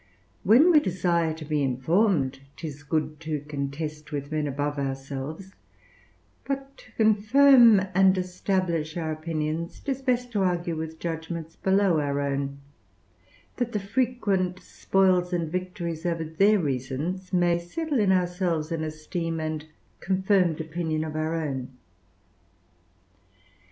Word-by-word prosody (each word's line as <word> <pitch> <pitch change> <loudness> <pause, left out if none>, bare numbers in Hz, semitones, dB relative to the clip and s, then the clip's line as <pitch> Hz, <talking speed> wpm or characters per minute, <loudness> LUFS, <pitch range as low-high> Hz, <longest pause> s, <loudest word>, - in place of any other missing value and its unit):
Where 240 - +6
we 310 - +7
desire 175 - 0
to 160 -1 -8
be 150 -1 0
informed, 135 - +1 0.2
'tis 150 -3 -7
good 150 +1 -2
to 155 -3 -3
contest 150 +1 -5
with 145 0 -4
men 155 -1 -1
above 145 +1 -2
ourselves; 135 +6 -5 0.9
but 275 0 -4
to 220 - -17
confirm 225 +1 +6
and 190 +1 +5
establish 180 -3 -1
our 160 -2 -2
opinions, 155 +1 -3
'tis 270 -2 -3
best 250 -2 0
to 205 -3 0
argue 175 -2 0
with 160 0 -5
judgments 165 0 -5
below 190 -3 +2
our 140 -1 -1
own, 140 0 -2 1.0
that 240 -2 -2
the 210 - 0
frequent 200 -4 0
spoils 185 -2 +1
and 165 -3 -1
victories 180 -3 -4
over 170 -2 -1
their 195 +7 +3
reasons 150 +5 -3
may 175 -2 +3
settle 285 - -2
in 200 -3 +3
ourselves 175 -3 0
an 165 -1 -2
esteem 160 +2 -4
and 155 -1 -4 0.3
confirmed 190 -3 +2
opinion 160 -1 -2
of 155 -1 -5
our 155 +1 -1
own. 135 -5 -4
170 Hz, 130 wpm, -26 LUFS, 155-190 Hz, 1.0 s, we